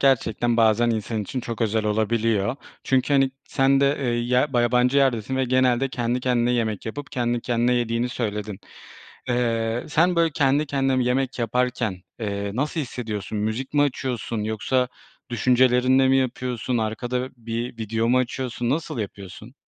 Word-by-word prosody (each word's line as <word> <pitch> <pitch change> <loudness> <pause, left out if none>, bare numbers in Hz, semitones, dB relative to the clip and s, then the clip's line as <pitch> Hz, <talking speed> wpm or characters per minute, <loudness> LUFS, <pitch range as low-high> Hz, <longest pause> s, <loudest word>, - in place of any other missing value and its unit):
gerçekten 120 -3 +2
bazen 115 +1 +4
insan 110 0 -2
için 125 +6 -4
çok 115 -2 -6
özel 110 0 0
olabiliyor. 110 +1 +1 0.3
Çünkü, 130 +2 +1
hani, 135 -1 +4 0.2
sen 135 0 +3
de, 140 +1 +3
eee, 120 -3 0
ya 125 +3 +2
ba 120 - +3
yabancı 125 +2 +2
yerdesin 130 -1 +1
ve 130 - +1
genelde 130 +1 +2
kendi 120 -1 -1
kendine 125 -1 +1
yemek 110 -3 -1
yapıp 145 +5 -6
kendi 120 -1 0
kendine 120 +1 +1
yediğini 120 0 0
söyledin. 105 -4 -4 0.7
Eee, 115 -1 0
sen, 175 +4 +3
böyle, 165 -1 +3
kendi 140 +1 +2
kendine 135 -2 +1
bir 125 - +1
yemek 130 +1 0
yaparken, 120 -2 0 0.2
eee, 100 -2 -3
nasıl 150 +6 -1
hissediyorsun? 110 -6 -4
Müzik 110 +7 -3
mi 145 - +4
açıyorsun 125 -5 -2
yoksa 115 +4 0 0.4
düşüncelerinle 125 +2 +4
mi 135 0 +4
yapıyorsun? 125 -1 -1
Arkada 120 +3 -2
bir 115 +1 -4
video 115 +1 -1
mu 125 - +4
açıyorsun? 125 -1 -2
Nasıl 145 -3 -2
yapıyorsun? 100 +3 -8
120 Hz, 155 wpm, -24 LUFS, 115-130 Hz, 0.7 s, bazen